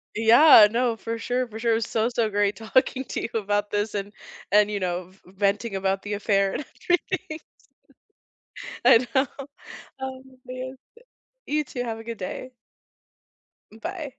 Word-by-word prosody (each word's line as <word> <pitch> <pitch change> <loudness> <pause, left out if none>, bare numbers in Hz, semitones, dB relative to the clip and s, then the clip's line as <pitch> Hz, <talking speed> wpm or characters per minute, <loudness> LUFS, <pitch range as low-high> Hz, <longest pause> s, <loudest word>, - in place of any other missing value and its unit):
Yeah, 225 +1 +8
no, 240 -1 +1
for 230 +1 -5
sure, 250 +2 -1
for 220 -1 -9
sure, 230 -1 +1
so, 225 +1 0
so 230 -3 0
great 205 0 +1
talking 260 +4 0
to - - -4
you - - -4
about 205 0 -1
this 205 +1 -2
and 200 0 -4 0.4
and, 210 0 +4
you 205 - -2
know, 180 0 -3
v 190 - -24
venting 200 +2 -1
about 195 0 -1
the 205 - -5
affair 200 -1 +1
and 290 - -4 0.2
everything. 330 -2 -1 1.5
I 235 +2 +6
know. 265 +1 +3 0.7
Oh, 265 0 -6 0.2
man. 255 +1 -7 0.7
You 300 +1 0
too, 250 -3 -5
have 225 -2 -4
a - - -9
good 230 -1 -6
day. 255 +7 -6 1.2
Bye. 310 - -6
225 Hz, 150 wpm, -25 LUFS, 205-255 Hz, 1.5 s, Yeah